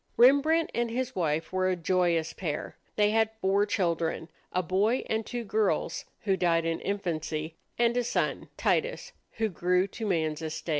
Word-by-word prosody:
Rembrandt 285 +6 +5
and 235 0 0
his 255 +2 -3
wife 160 -1 -1
were 185 0 +2
a 185 - +1
joyous 170 -2 +1
pair. 155 -6 -4 0.2
They 210 0 +3
had 220 0 +3
four 200 +1 +2
children, 170 -4 -1 0.2
a 180 - 0
boy 200 +9 +1
and 220 0 -1
two 240 +2 -4
girls 215 -1 0 0.2
who 195 -2 +1
died 170 -2 +2
in 165 0 -1
infancy 160 -5 -2 0.2
and 235 0 +3
a 245 - +2
son, 235 - -1
Titus, - - 0 0.2
who 220 0 0
grew 180 0 +1
to 220 +2 -5
man's 160 -4 0
estate. 160 +1 -5
190 Hz, 165 wpm, -28 LUFS, 165-225 Hz, 0.2 s, Rembrandt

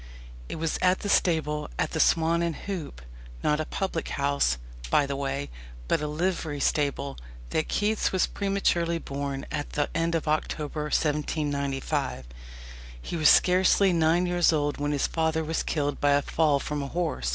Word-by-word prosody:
It - - -4
was 160 -1 -2
at 185 0 +3
the 205 - -3
stable 150 -5 +1
at - - 0
the - - -2
"Swan 165 +1 +3
and 170 -2 -1
Hoop" 160 - -6 0.4
not 150 0 +2
a 155 - -1
public 190 -3 -3
house, 140 - +1 0.3
by 145 - +4
the 140 0 -3
way, 135 - -3 0.4
but - - +1
a 150 - -2
livery 155 -1 -2
stable 140 -1 0 0.3
that 155 - 0
Keats 210 +1 +1
was 185 - +2
prematurely 185 -4 0
born 140 -2 -4
at 145 -1 -4
the 145 -1 0
end 165 0 +1
of 160 - -2
October 150 0 -1
1795. 145 - -1 0.7
He 115 - -6
was 155 -3 +5
scarcely 185 +1 +5
nine 165 +2 +3
years 175 -1 +3
old 145 -2 0
when 145 0 -1
his 145 -2 +1
father 160 -1 0
was 160 +1 -1
killed 145 -2 -2
by 145 0 +4
a 145 0 +2
fall 150 -3 +2
from 150 +1 -3
a 140 - -4
horse. 160 - -2
155 Hz, 170 wpm, -27 LUFS, 145-170 Hz, 0.7 s, was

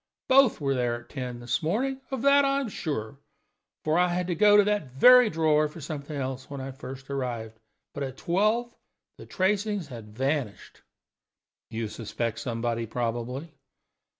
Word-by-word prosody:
Both 265 -2 +5
were 140 -2 0
there 120 -2 0
at 120 - -22
ten 125 -3 -5
this 120 +6 -1
morning; 260 +12 -1
of 265 -3 -4
that 280 0 +6
I 275 0 +2
am 270 -5 -3
sure, 140 - -4 0.6
for 155 +2 +2
I 180 - +4
had 180 +1 -1
to 180 - -1
go 205 +4 +6
to 205 - +7
that 210 -7 0
very 250 - +7
drawer 155 -2 +2
for 150 +3 -11
something 150 -1 -6
else 130 -1 -4
when 140 -1 -6
I 135 +1 -5
first 135 +1 -9
arrived. 120 -5 -4 0.3
But 140 - -6
at 135 -1 -4
twelve 215 +7 +1 0.5
the - - -11
tracings 200 -2 0
had 110 -4 -10
vanished." 135 -6 -2 0.9
"You 115 0 -3
suspect 115 +1 -4
somebody, 115 -1 -2
probably?" 120 +6 -3
140 Hz, 165 wpm, -27 LUFS, 120-200 Hz, 0.9 s, to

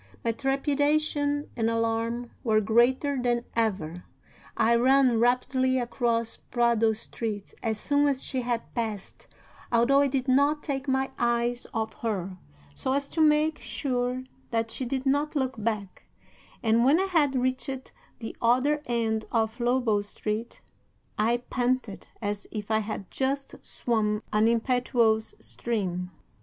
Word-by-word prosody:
My 230 - +3
trepidation 290 +3 0
and 225 -1 +1
alarm 230 +1 -1
were 220 -3 +3
greater 245 +6 +2
than 240 -1 0
ever. 185 -7 -1 0.5
I 230 - +4
ran 255 0 +4
rapidly 255 +2 +2
across 235 -2 -1
Prado 235 -2 +2
Street 215 -1 -5
as 220 -2 -1
soon 290 +3 +2
as 275 -2 0
she 260 -2 -2
had 240 -1 -3
passed, 220 -5 -4 0.4
although 245 +4 +4
I 285 - +4
did 265 -1 -1
not 285 +3 +3
take 280 -2 -3
my 265 0 +1
eyes 240 0 0
off 220 -1 -2
her, 190 -5 -3 0.3
so 260 - -2
as 280 0 0
to 325 - -1
make 305 0 +3
sure 245 +2 -2 0.3
that 225 -1 -1
she 260 - -4
did 260 +2 -2
not 285 +3 +1
look 260 -5 -1
back, 210 -4 -3 0.6
and, 225 +1 +4
when 280 +7 +5
I 385 - +2
had 310 -8 +2
reached 255 +1 -2 0.3
the 225 - -7
other 255 +6 +3
end 225 -2 0
of 225 0 0
Lobo 240 -3 +2
Street, 215 +3 -5 0.6
I 235 +3 +2
panted 250 -4 -1
as 205 -2 -3
if 210 -1 -5
I 220 - +3
had 210 -3 -5
just 275 +1 -1
swum 215 -3 -1
an 215 +1 +4
impetuous 235 -2 +2
stream. 185 -6 -3
240 Hz, 140 wpm, -27 LUFS, 225-265 Hz, 0.6 s, when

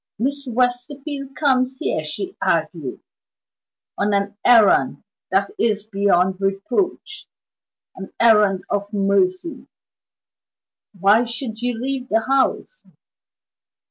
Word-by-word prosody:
"Miss 280 +4 -2
Westerfield 270 +3 -2
comes 260 -3 +1
here," 155 - -2
she 365 - -6
argued, - - -1 1.0
"on 205 0 +1
an 200 +1 -1
errand 230 -5 +4 0.3
that - - +1
is 215 -3 +1
beyond 195 -3 +1
reproach 240 - -2 0.7
an 190 0 -9
errand 210 -5 +4
of 200 0 -3
mercy. 195 - 0 1.3
Why 205 +5 +5
should 230 -1 -5
you 245 -2 -2
leave 260 0 -3
the 225 +1 +2
house?" 270 - 0
230 Hz, 100 wpm, -21 LUFS, 200-265 Hz, 1.3 s, Why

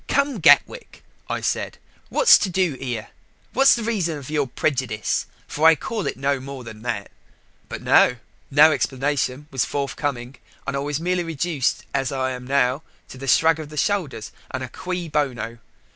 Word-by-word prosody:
'Come, 280 -4 +1
Gatwick,' - - +3 0.3
I - - -2
said, - - -2 0.3
'what's - - +6
to 200 - -1
do 180 -3 +1
here? 125 -4 -5 0.4
What's 270 +2 +6
the 235 - -4
reason 190 -9 -1
of 140 0 -9
your 145 -3 0
prejudice 125 -5 -1 0.2
for 155 +2 +2
I 165 - +7
can - - -20
call 220 -4 -2
it - - -3
no 140 0 0
more 135 0 -8
than 110 -2 -10
that?' 115 -4 -4 0.6
But, - - -6
no! 125 - +5 0.3
no 150 +3 +7
explanation 140 0 -1
was 130 -3 +1
forthcoming. 140 -2 -3 0.3
And 140 - -3
I - - 0
was 145 +1 -2
merely 180 +1 0
reduced, 165 -3 -1
as 135 -1 0
I 130 -1 -1
am 125 -1 -7
now, 135 0 +2 0.3
to 130 +1 -10
a - - -5
shrug 160 +3 +4
of 155 -2 -7
the 150 - -10
shoulders, 150 - -1 0.2
and 130 0 -4
a 130 - -6
cui 180 +2 -4
bono. 125 -6 -2
140 Hz, 180 wpm, -22 LUFS, 130-165 Hz, 0.6 s, I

